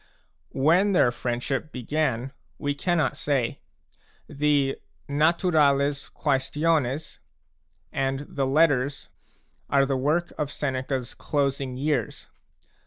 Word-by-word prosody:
When 175 +9 +4
their 125 -9 +4
friendship 125 +5 -3
began 130 -1 -1 0.3
we 145 -1 -1
cannot 170 -1 0
say. 140 -5 -1 0.7
The 145 -1 +1 0.3
Naturales 145 -2 +2
Quaestiones 150 0 0 0.7
and 135 0 -1
the 135 -1 -1
Letters 140 -2 +2 0.6
are 135 -1 +4
the 135 0 0
work 155 +6 0
of 145 -2 -1
Seneca's 130 -3 -3
closing 140 -3 -1
years. 140 -4 -1
140 Hz, 95 wpm, -25 LUFS, 135-155 Hz, 0.7 s, When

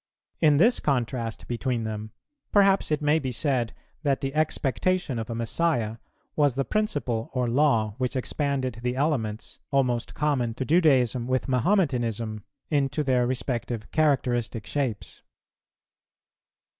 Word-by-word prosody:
In 150 -2 +5
this 230 - +4
contrast 120 -4 -2
between 120 0 -1
them, 110 0 -4 0.4
perhaps 195 -1 +4
it 150 -1 0
may 150 +2 +3
be 130 -4 -3
said 125 -3 0 0.3
that 140 -4 +1
the 135 0 -2
expectation 155 -1 0
of 115 - -5
a 115 - -3
Messiah 115 -1 0 0.4
was 145 -4 +3
the 135 0 0
principle 145 - -1
or 125 -1 0
law 115 -5 +2
which 130 +1 -1
expanded 130 -2 -1
the 125 +1 -1
elements, 130 -7 -2
almost 125 -4 0
common 130 -6 0
to 130 - -3
Judaism 130 -7 +3
with 130 +1 0
Mahometanism, 120 - 0 0.3
into 145 0 +1
their 125 -3 +2
respective 120 -3 -3
characteristic 125 -7 +1
shapes. 130 -8 -3
130 Hz, 130 wpm, -26 LUFS, 115-145 Hz, 0.4 s, In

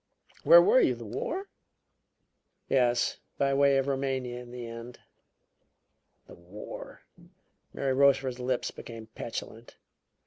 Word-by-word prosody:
"Where - - +8
were 475 +5 +5
you - - +2
the - - -10
War?" 410 -5 -4 1.2
"Yes 120 -2 +1 0.2
by 140 0 +1
way 140 0 +4
of 135 - +1
Roumania 130 -3 -2
in 125 -1 -11
the 120 0 -7
end." 115 +1 -9 1.3
"The - - -14
War!" 90 +5 -10 0.7
Mary 135 -1 -1
Rochefort's 135 -2 +3
lips 125 0 -1
became 115 -1 -10
petulant. 115 0 -7
130 Hz, 115 wpm, -29 LUFS, 120-140 Hz, 1.3 s, Where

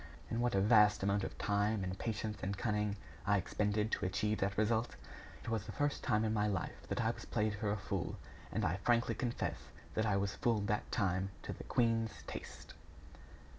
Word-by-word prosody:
And 115 - 0
what 120 -3 +2
a 95 - +4
vast 105 -1 +6
amount 100 0 +2
of - - -5
time 105 0 +1
and 95 0 -2
patience 110 -1 -2
and 100 +1 -2
cunning 105 -1 0 0.3
I 100 0 +3
expended 105 +3 0
to - - 0
achieve 105 +3 0
that 95 0 0
result! 110 +2 +1 0.5
It - - -5
was 110 -2 -1
the - - -4
first 145 0 -1
time 110 +1 +2
in 110 - +1
my 105 -1 +2
life 100 -3 -3
that - - -1
I - - +3
was - - -9
played 105 0 0
for 105 0 -2
a 105 - 0
fool, 95 -3 -3 0.3
and 110 - 0
I 90 +1 +1
frankly 115 +2 +2
confess 120 +1 -2 0.3
that 110 0 +1
I 100 -2 +3
was 100 0 0
fooled 110 -4 +1
that 105 +1 -1
time 95 0 +1
to - - -4
the - - -8
queen's 115 -2 +1
taste!" - - -8
105 Hz, 205 wpm, -36 LUFS, 100-110 Hz, 0.5 s, vast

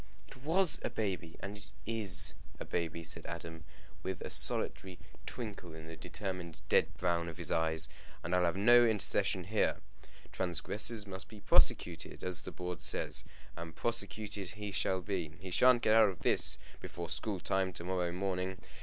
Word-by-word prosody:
"It - - -14
was 165 +5 +3
a - - -2
baby, 95 -6 -3
and 100 +2 -5
it 100 -7 -9 0.2
is 105 -6 +5 0.3
a - - -5
baby," 85 -1 -3
said 80 - -3
Adam, 80 -1 -7 0.4
with 95 -2 -4
a - - -5
solitary 95 -2 +1 0.3
twinkle 100 -8 -7
in 80 0 -10
the 80 0 -8
determined 90 -4 -6
dead - - +4
brown 85 -1 0
of 85 - -9
his 85 -4 -2
eyes. 80 -1 +1 0.4
"And 85 - -3
I'll 90 -1 +3
have 85 +2 0
no 120 +4 +7
intercession 100 -4 +3
here. 105 +5 +1 0.5
Transgressors 100 +5 -1
must 95 -1 -7
be 110 - -12
prosecuted, - - +2
as 90 -2 -3
the - - -7
board 90 -2 -5
says. - - +1 0.3
And 85 -1 -8
prosecuted 105 -4 -1
he 105 -1 -5
shall 95 -1 0
be. 90 -5 -3
He 95 0 -8
sha'n't 125 +5 +5
get 110 - +4
out 110 -2 +7
of 90 -4 -7
this - - +4 0.2
before 85 -1 -6
school 100 +2 -1
time 95 +1 0
to 85 - -7
morrow 90 -1 -1
morning. 95 0 -2
95 Hz, 170 wpm, -33 LUFS, 85-105 Hz, 0.5 s, no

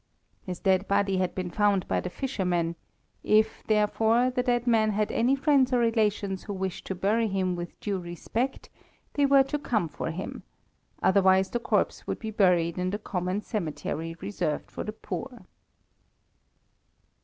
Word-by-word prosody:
His 180 -3 -6
dead 190 0 +2
body 200 -1 +2
had 185 -1 -1
been 185 -2 -3
found 205 0 +2
by - - +1
the 180 - -4
fishermen; 180 -9 -1 0.5
if, 215 +1 +3
therefore, 220 +3 +3
the 250 - 0
dead 245 -1 +1
man 225 -3 +3
had 210 0 0
any 250 +4 +2
friends 275 -2 +3
or - - +4
relations 210 -5 +1
who 205 - -6
wished 190 -1 -4
to 190 - -3
bury 215 +5 +1
him 190 -2 0
with 175 0 -7
due 200 -3 -2
respect, 200 +9 -4 0.4
they 285 -1 +3
were 275 -1 +6
to 295 +2 -3
come 215 - 0
for 160 - -5
him, 170 +4 -5 0.6
otherwise 190 0 +4
the 240 - -1
corpse - - 0
would - - -2
be 220 -1 -5
buried 180 -4 +2
in 180 0 0
the 205 - -2
common 185 -1 -2
cemetery 165 -4 -4
reserved 175 -7 -3
for - - -5
the 215 - -4
poor. 235 0 -7
205 Hz, 165 wpm, -27 LUFS, 185-230 Hz, 0.6 s, were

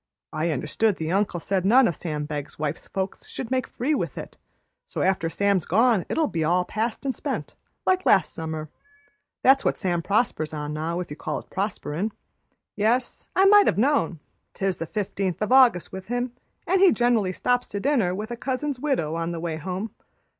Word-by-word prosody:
I 155 +2 0
understood 160 - 0
the 160 -1 -3
uncle 195 -2 +1
said 190 +2 -1
none 240 +6 +6
o' - - +1
Sam 150 -2 -4
Begg's 145 -2 -5
wife's 150 +1 -3
folks 190 0 -4
should 250 - -6
make 255 -1 0
free 275 +6 -1
with - - -2
it, - - -7 0.5
so - - -2
after 185 -3 +1
Sam's 200 +1 +1
gone 220 +1 +3
it'll 325 - 0
all 175 - +1
be - - -18
past 225 +5 -2
an' 270 - +2
spent, - - -4 0.3
like 370 0 +2
last 190 - +4
summer. 160 -2 -5 0.7
That's 270 +1 +6
what - - +1
Sam 175 -3 0
prospers 165 -6 0
on 150 0 -4
now, 160 +3 -2
if 175 - -8
you - - -4
can - - -18
call 155 - -1
it - - -10
prosperin'. 195 0 -2 0.6
Yes, 235 +4 0
I 380 - +5
might 410 0 +7
have - - +2
known. 265 - +2 0.4
'Tis 195 -2 -1
the 165 - -4
15th 195 -2 -2
o' 210 +3 +1
August 245 -11 +5
with 190 0 -8
him, 245 +1 -1 0.3
an' 375 +2 +2
he 380 -2 +7
gener'ly 235 -6 +2
stops 245 +6 0
to 205 - -3
dinner 220 -8 +1
with 215 +4 -5
a - - -2
cousin's 265 +2 -2
widow 255 - 0
on 165 +1 -2
the 170 - -4
way 165 -1 -3
home. 185 +6 -4
195 Hz, 195 wpm, -25 LUFS, 165-245 Hz, 0.7 s, might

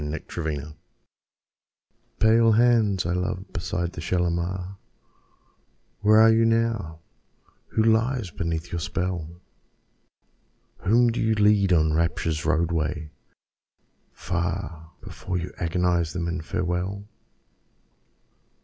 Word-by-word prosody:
Kashmiri 80 +1 -4
Song 75 +2 -10 1.4
Pale 115 +1 +4
hands 110 -5 +3
I 85 - 0
love 90 +1 -3
beside 90 0 -3
the 80 - -7
Shalimar, 90 +2 -2 1.2
Where 110 +1 +5
are 110 0 +7
you 115 +1 +3
now? 115 -8 0 0.7
Who 110 - 0
lies 115 -2 +1
beneath 85 -2 -4
your 85 - -2
spell? 85 0 -3 1.5
Whom 120 +4 +3
do 115 - -2
you 110 0 +2
lead 105 -2 +3
on 80 -3 +3
Rapture's 80 -1 -1
roadway, 80 -2 -1 1.0
far, 85 -2 -4
Before 90 -1 -5
you 90 0 -5
agonise 85 -1 0
them 85 -2 -3
in 85 0 -3
farewell? 90 +3 -3
90 Hz, 105 wpm, -25 LUFS, 85-105 Hz, 1.5 s, are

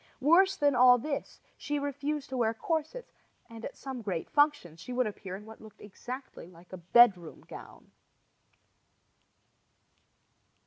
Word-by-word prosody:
Worse 365 +7 +4
than 285 -1 +2
all 250 0 +6
this, 280 +3 -5 0.2
she 295 - -4
refused 285 +1 -4
to 260 - -4
wear 225 -2 0
corsets, 325 - -4 0.3
and 230 0 -12
at - - -7
some 265 -3 -7
great 185 -6 -5
functions 290 - +1
she 250 - -9
would 250 0 0
appear 195 -3 -6
in 205 +2 -11
what 220 0 -13
looked 220 -2 -15
exactly 245 +1 -9
like 175 +1 -18
a - - -6
bedroom 180 -1 +3
gown. - - -13
245 Hz, 140 wpm, -29 LUFS, 205-290 Hz, 0.3 s, all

